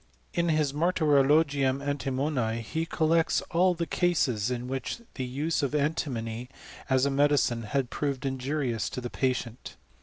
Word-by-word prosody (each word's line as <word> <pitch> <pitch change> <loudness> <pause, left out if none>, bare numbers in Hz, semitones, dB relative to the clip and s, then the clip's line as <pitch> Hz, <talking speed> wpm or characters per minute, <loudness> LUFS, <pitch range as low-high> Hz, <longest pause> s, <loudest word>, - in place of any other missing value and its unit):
In 170 -1 +1
his 155 -3 +1
Martyrologium 145 -4 +3
Antimonii 135 -4 -1
he 160 +9 -3
collects 165 0 +2
all 180 +1 +3
the 170 0 -2
cases 135 - +1
in 125 0 -3
which 135 - -4
the 130 - -3
use 145 +6 -1
of 140 +1 -1
antimony, 125 -6 -2 0.4
at 130 0 +3
a 140 - +1
medicine, 140 -4 +2
had 125 +3 -2
proved 140 -3 -2
injurious 130 -3 -1
to - - -5
the 120 -1 -6
patient. 125 -2 -2
140 Hz, 145 wpm, -28 LUFS, 125-155 Hz, 0.4 s, Martyrologium